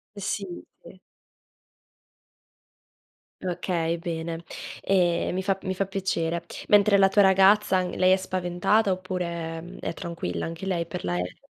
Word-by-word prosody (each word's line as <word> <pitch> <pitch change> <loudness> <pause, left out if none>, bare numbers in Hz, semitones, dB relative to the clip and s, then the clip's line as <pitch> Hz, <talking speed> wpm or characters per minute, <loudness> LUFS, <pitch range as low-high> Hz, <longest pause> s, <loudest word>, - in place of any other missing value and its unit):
Sì, 200 0 -3 0.4
sì. 185 +2 -14 2.4
Okay, 170 -2 -1
bene. 165 0 -4 0.4
Ehm, 180 -2 +1
mi 190 - -1
fa 195 -1 0
mi 190 0 -3
fa 195 +1 0
piacere. 170 -3 -2 0.3
Mentre 205 0 +6
la 195 0 +6
tua 205 +1 +4
ragazza, 190 0 +5
n 180 - -4
lei 185 0 +4
è - - +6
spaventata 185 +3 +1
oppure, 170 -3 -3
mhmm, 175 +2 -11
è - - -4
tranquilla 90 - -4
anche 165 +3 -6
lei, 170 -3 -1
per - - -6
l'aereo? 90 0 -2
180 Hz, 135 wpm, -26 LUFS, 170-190 Hz, 2.4 s, Mentre